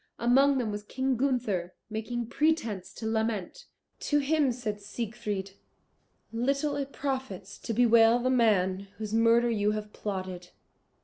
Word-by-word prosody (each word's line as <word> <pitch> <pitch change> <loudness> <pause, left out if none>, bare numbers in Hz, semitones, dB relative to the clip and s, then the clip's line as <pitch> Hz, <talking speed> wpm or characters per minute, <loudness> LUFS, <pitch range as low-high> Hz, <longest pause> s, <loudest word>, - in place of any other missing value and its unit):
Among 270 +4 +4
them 235 -4 -1
was 205 0 -4
King 260 +5 -1
Gunther, 225 -9 -1
making 230 +2 -3
pretence 235 - 0
to 225 - -7
lament. 220 - -2 0.3
To 295 - +1
him 290 -1 +2
said 215 -4 -4
Siegfried, 210 -2 -4 0.8
"Little 275 +5 0
it 280 -1 -3
profits 260 -10 -4
to - - -5
bewail 230 0 +5
the 255 +1 0
man 200 -6 +2
whose 215 0 -5
murder 230 +1 +4
you 210 -1 +1
have 210 0 -5
plotted. 185 -3 -5
230 Hz, 135 wpm, -29 LUFS, 205-255 Hz, 0.8 s, bewail